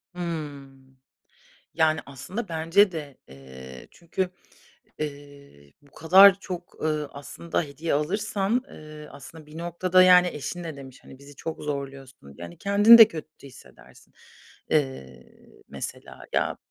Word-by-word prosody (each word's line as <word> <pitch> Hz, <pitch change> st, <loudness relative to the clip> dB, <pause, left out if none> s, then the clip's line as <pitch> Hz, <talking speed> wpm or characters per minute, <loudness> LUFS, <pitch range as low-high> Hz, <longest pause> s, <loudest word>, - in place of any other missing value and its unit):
Hımm. 140 Hz, -6 st, -7 dB, 0.8 s
Yani, 160 Hz, -1 st, +2 dB
aslında 180 Hz, -, -7 dB
bence 165 Hz, +5 st, +2 dB
de, 145 Hz, -5 st, -7 dB
eee, 65 Hz, -1 st, -13 dB
çünkü 180 Hz, +2 st, -4 dB, 0.7 s
ııı 140 Hz, -, -9 dB
bu 145 Hz, -, -25 dB
kadar 190 Hz, +4 st, +6 dB
çok, 180 Hz, -3 st, -9 dB
ııı, 150 Hz, -2 st, -1 dB
aslında, 145 Hz, +4 st, -4 dB
hediye 150 Hz, +2 st, -4 dB
alırsan, 200 Hz, -, -1 dB
ııı, 155 Hz, 0 st, -12 dB
aslında, 155 Hz, +3 st, -13 dB
bir 150 Hz, +1 st, -13 dB
noktada, 175 Hz, +2 st, +2 dB
yani, 180 Hz, -1 st, +6 dB
eşin 175 Hz, +3 st, -6 dB
ne 160 Hz, -3 st, -7 dB
demiş: 135 Hz, -2 st, -12 dB
Hani, 130 Hz, -, -14 dB
"Bizi 140 Hz, +1 st, -15 dB
çok 160 Hz, +4 st, -7 dB
zorluyorsun." 135 Hz, -, -7 dB
Yani, 85 Hz, 0 st, -10 dB
kendin 205 Hz, +3 st, +7 dB
de 225 Hz, -2 st, +10 dB
kötü 155 Hz, -3 st, -11 dB
hissedersin, 130 Hz, -, -18 dB, 0.6 s
ııı, 135 Hz, -, -1 dB, 0.5 s
mesela. -, -, -9 dB
Ya, -, -, 0 dB
155 Hz, 125 wpm, -25 LUFS, 140-175 Hz, 0.8 s, de